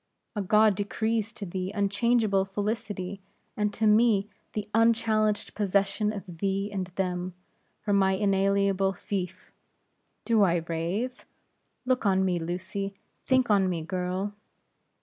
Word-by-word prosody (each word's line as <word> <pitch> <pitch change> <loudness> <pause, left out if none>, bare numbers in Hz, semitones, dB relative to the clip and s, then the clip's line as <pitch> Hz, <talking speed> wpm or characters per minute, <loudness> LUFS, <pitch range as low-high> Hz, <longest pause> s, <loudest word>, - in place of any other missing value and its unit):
A 205 - -1
god 210 +2 +4
decrees 220 +2 -1
to 205 - -6
thee 185 +1 -3
unchangeable 205 0 +2
felicity; 200 -1 -3 0.3
and 210 -1 0
to 220 - 0
me, 215 -1 +4 0.2
the 210 -1 -3
unchallenged 220 -2 +2
possession 200 +1 +1
of 205 -2 -6 0.2
thee 195 +2 -1
and 190 -2 -2
them, 180 -1 -2 0.5
for 205 -1 0
my 190 -1 +4
inalienable 195 0 +2
fief. 185 -1 -5 0.7
Do 225 -2 +3
I 175 -4 +3
rave? 180 +10 -3 0.6
Look 255 -1 +1
on 190 -1 +3
me, 180 -2 +1
Lucy; 185 +4 -4 0.3
think 260 -3 +3
on 195 -2 +4
me, 170 -3 -2
girl." 185 +3 -2
200 Hz, 130 wpm, -28 LUFS, 190-215 Hz, 0.7 s, god